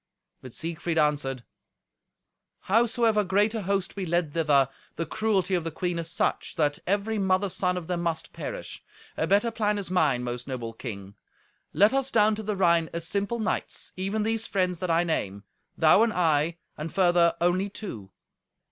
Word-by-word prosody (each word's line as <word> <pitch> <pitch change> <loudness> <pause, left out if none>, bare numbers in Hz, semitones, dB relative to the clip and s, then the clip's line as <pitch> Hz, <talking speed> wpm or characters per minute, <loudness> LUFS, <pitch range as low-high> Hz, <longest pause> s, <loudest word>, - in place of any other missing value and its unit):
But 130 - -10
Siegfried 165 +3 -3
answered, 145 -4 +1 1.2
"Howsoever 225 0 +2
great 205 +3 +2
a 225 - -2
host 195 0 -1
we 200 - -3
led 170 -3 0
thither, 150 -5 +3 0.3
the 165 - -2
cruelty 200 -3 0
of 175 -2 +1
the 165 - -2
queen 175 +2 -2
is 165 -1 -5
such, 180 - -1
that 150 -3 +1
every 205 +3 0
mother's 190 0 +1
son 180 -1 0
of 175 - -5
them 175 0 -2
must 170 -2 -3
perish. - - -6 0.3
A - - -1
better 205 +4 +3
plan 210 -2 0
is 195 -3 -5
mine, 150 -9 +2
most 120 +1 -5
noble 120 -4 -5
king. 100 -5 -7 0.6
Let 205 +5 +4
us 270 -1 +1
down 215 -3 +4
to 215 - -4
the 210 -1 -2
Rhine 170 -3 +3
as 170 0 -4
simple 200 +5 -1
knights, 220 -1 -3
even 195 +3 -1
these 225 0 -1
friends 180 -3 0
that 185 -1 -3
I 165 +1 +3
name. 100 - -2 0.3
Thou 160 +6 +6
and 230 -1 +3
I, 165 -1 +1 0.2
and, 150 +1 -5
further, 175 -2 +3
only 180 +3 +1
two. 115 - -8
180 Hz, 175 wpm, -27 LUFS, 160-205 Hz, 1.2 s, Thou